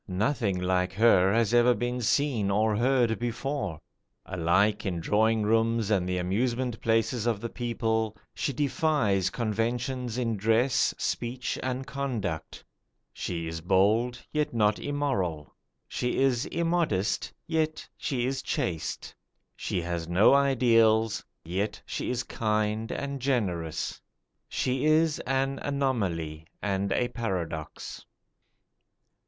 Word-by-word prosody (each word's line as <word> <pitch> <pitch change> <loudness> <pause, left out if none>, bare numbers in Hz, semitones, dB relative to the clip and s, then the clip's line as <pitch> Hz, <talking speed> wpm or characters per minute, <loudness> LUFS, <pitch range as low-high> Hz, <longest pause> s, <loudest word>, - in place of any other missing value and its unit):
Nothing 100 0 0
like 90 0 0
her 95 -3 +5
has 115 0 +2
ever 120 0 +5
been 120 +3 -2
seen 120 -4 +1
or 105 +2 +2
heard 120 -1 +2
before. 120 - -3 0.5
Alike 95 +4 +2
in 90 -3 -2
drawing 110 +5 +2
rooms 115 0 +2
and 90 -3 +1
the 90 - 0
amusement 115 +6 -1
places 115 +1 +1
of 115 -4 +1
the 115 +2 -5
people, 110 -3 -1 0.2
she - - -1
defies 135 - +1
conventions 120 +2 -2
in 115 -3 0
dress, 115 +5 +3
speech, 125 +1 -2
and 130 +1 -2
conduct. 115 - -4 0.5
She 85 -1 -4
is 80 0 -5
bold, 105 +7 +2
yet 150 -5 -1
not 105 -2 +3
immoral. 125 - -2 0.3
She 125 - -2
is 130 -2 +2
immodest, 165 - 0
yet 160 -2 -1
she 125 -5 -2
is 135 0 -1
chaste. 85 - -3 0.4
She 90 - -2
has 85 -1 -3
no 90 +9 +5
ideals, 115 -5 +4 0.2
yet 100 +5 -2
she - - -3
is 125 0 -1
kind 110 0 -1
and 140 -1 -3
generous. 95 - -1 0.5
She 130 +1 -1
is 155 0 +3
an 135 +1 0
anomaly 95 - -1
and 100 -1 -1
a 120 - +2
paradox. 90 -9 -4
115 Hz, 120 wpm, -28 LUFS, 95-130 Hz, 0.5 s, her